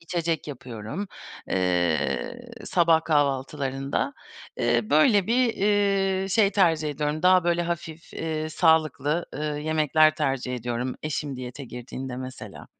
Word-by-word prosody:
İçecek 165 -2 -2
yapıyorum, 130 - -6 0.4
eee, 90 -8 0 0.2
sabah 165 -2 +3
kahvaltılarında. 135 -2 0 0.4
Eee, 120 -2 +1
böyle, 180 - +5
bir, 240 0 +2
iii, 195 -1 +1
şey 205 -1 +4
tercih 165 -6 +2
ediyorum, 150 +2 -2
daha, 185 -1 +5
böyle, 175 0 +2
hafif, 170 -1 -5
eee, 155 -1 -3
sağlıklı, 155 -1 +2
ııı, 150 0 -3
yemekler 155 0 +3
tercih 135 -4 -1
ediyorum 120 +1 -3
eşim 145 -3 -3
diyete 130 +2 -7
girdiğinde 125 +1 -7
mesela. 130 0 -8
155 Hz, 115 wpm, -25 LUFS, 130-170 Hz, 0.4 s, böyle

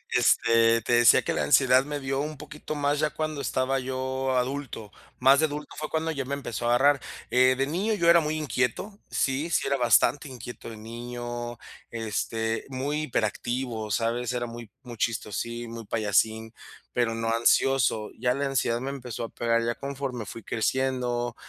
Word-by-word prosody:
Este, 115 0 +4
te 120 - 0
decía 120 -1 +6
que - - -1
la - - -1
ansiedad 130 -2 +5
me 145 0 -4
dio 135 0 -2
un 150 0 -4
poquito 155 +2 -7
más 145 0 0
ya 155 -1 +2
cuando 155 -2 -3
estaba 130 +2 0
yo 130 0 -2
adulto, 125 -5 -3 0.3
más 135 +3 +6
de 155 - +4
adulto 150 0 -7
fue 155 +1 -5
cuando 160 0 -1
ya 140 -3 -3
me 140 +2 -2
empezó 120 -4 -5
a 120 - +4
agarrar. 140 +1 +4 0.3
Eh, 130 +1 +5
de 135 - +1
niño, 195 +9 0
yo 170 -3 +3
era 170 - +7
muy 155 -1 -1
inquieto, 150 - -2
sí 140 +5 0
sí - - +1
era 140 - +1
bastante 130 +4 +3
inquieto 120 -2 -9
de 110 - -9
niño, 120 +1 -6 0.3
este, 110 0 -2
muy 140 +4 -2
hiperactivo, 120 -2 -2
¿sabes?, 115 +3 -1
era 120 -1 -1
muy 115 -1 -9
muy 120 -2 -9
chistosín, 115 +1 -3
muy 115 -2 -7
payasín, 110 +1 +1 0.4
pero 115 -2 +1
no 115 0 -1
ansioso. 115 -2 +2
Ya 125 0 +1
la 140 0 -1
ansiedad 125 -3 0
me 135 +1 -3
empezó 125 -4 -6
a 115 - -4
pegar, 115 0 0
ya 120 - 0
conforme 135 -5 -5
fui 115 - -8
creciendo, 120 0 -1
125 Hz, 180 wpm, -27 LUFS, 115-140 Hz, 0.4 s, era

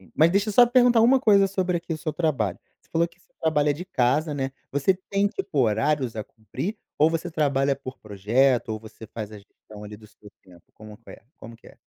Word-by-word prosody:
Sim. 95 - -21
Mas 160 +2 +4
deixa 200 +4 +1
eu - - -1
só 245 +4 +7
perguntar 245 -1 +4
uma 260 +3 +5
coisa 200 -5 +5
sobre 185 -2 -1
aqui 170 0 -5
o 155 - -4
seu 155 0 -4
trabalho. 135 - -1 0.2
Você - - -33
falou 170 +1 +1
que 170 +1 -27
você - - -32
trabalha 150 -2 +2
de 160 +5 -7
casa, 150 0 0
né. 135 -1 -2 0.2
Você 145 +7 +2 0.2
tem 200 0 +2
tipo 195 -6 -5
horários 125 +2 +1
a 110 - -4
cumprir 135 - -6 0.2
ou 155 +2 +5
você 165 +2 -3
trabalha 140 -3 +1
por 130 -1 -9
projeto, 115 +5 +1
ou 110 0 -4
você 110 0 -12
faz 110 -1 -7
a 105 - -10
gestão 105 +1 -15
ali 105 0 -9
do 110 0 -16
seu 105 0 -18
tempo? 90 -2 -19
Como 110 -1 -13
que 115 - -17
é - - -13
como 115 +1 -12
que - - -21
é? - - -16
145 Hz, 235 wpm, -24 LUFS, 110-175 Hz, 0.2 s, só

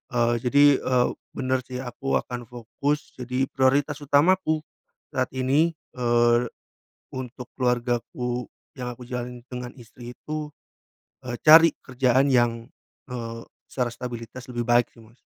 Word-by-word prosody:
eee, 120 0 +3
jadi, 140 +4 +4 0.2
eee, 125 -1 +2 0.3
bener 130 0 0
sih 130 0 -5
aku 135 +2 -2
akan 120 -1 -6
fokus, 125 +5 -3
jadi 125 +2 -2
prioritas 140 +2 +2
utamaku 155 +3 +3 0.5
saat 130 -1 0
ini, 140 +6 +2 0.2
eee, 120 0 +3 0.6
untuk 125 -1 -7
keluargaku 125 0 -1 0.3
yang 125 -1 -4
aku 125 - -17
jalani 125 -1 -5
dengan 125 -1 -6
istri 120 0 -11
itu, 150 -1 -6 0.7
eee, 120 -1 -3
cari 160 +1 +8
kerjaan 130 +1 +2
yang, 120 -2 +2 0.4
eee, 115 -2 -5 0.3
secara 125 -2 -1
stabilitas 120 0 -7
lebih 120 -1 -3
baik 120 0 +3
sih 115 - -17
Mas. 115 +3 -21
125 Hz, 130 wpm, -25 LUFS, 120-135 Hz, 0.7 s, cari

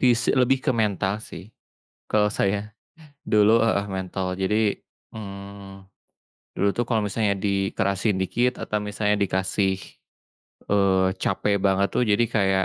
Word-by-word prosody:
pis 125 -2 +3
eee, - - -1
lebih 130 +1 +3
ke - - +2
mental 100 -4 0
sih, 105 -1 -10 0.6
kalau 105 -1 +3
saya. 105 -1 0 0.8
Dulu 105 0 +5
heeh, 110 -3 +1
mental. 95 0 -3
Jadi, 95 +3 +1 0.6
mmm, 100 -1 -9 0.7
dulu 100 - +1
tuh 120 - +1
kalau 115 -3 +1
misalnya 105 0 0
dikerasin 100 +1 0
dikit 120 +6 +1
atau 105 - -2
misalnya 105 0 0
dikasih, 95 0 0 1.0
eee, 95 -2 +3 0.2
capek 105 - 0
banget 100 0 +3
tuh - - +2
jadi 105 +3 +3
kayak, 95 -2 +2
100 Hz, 135 wpm, -24 LUFS, 95-110 Hz, 1.0 s, Dulu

